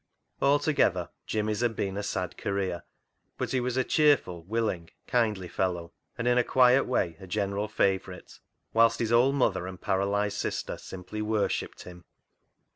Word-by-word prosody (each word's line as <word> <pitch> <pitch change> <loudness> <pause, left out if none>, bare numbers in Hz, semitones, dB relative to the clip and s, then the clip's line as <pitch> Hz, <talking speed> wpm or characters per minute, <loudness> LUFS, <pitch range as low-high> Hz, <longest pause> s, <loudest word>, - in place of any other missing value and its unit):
Altogether, 140 - +2 0.2
Jimmy's 105 -1 -1
had 120 -2 +1
been 95 -1 -2
a 100 - -2
sad 90 -3 -3
career; 95 -3 -2 0.6
but - - -3
he 130 - +1
was 125 0 -2
a 130 - +3
cheerful, 145 - +2
will 115 +3 0
ing, 85 -4 -4 0.2
kindly 110 -6 0
fellow, 85 -2 -2 0.2
and 115 - -2
in 125 0 +4
a - - +4
quiet 130 +1 +5
way 85 -9 0
a 95 - -10
general 100 +1 -1
favourite, 95 -3 -1 0.3
whilst 115 0 +5
his 115 -1 -1
old 130 +4 +4
mother 95 -9 +1
and 95 -1 -8
paralysed 100 +1 0
sister - - -3
simply 95 +3 -7
worshipped 105 -1 -1
him. 90 -1 -12
105 Hz, 160 wpm, -28 LUFS, 95-120 Hz, 0.6 s, quiet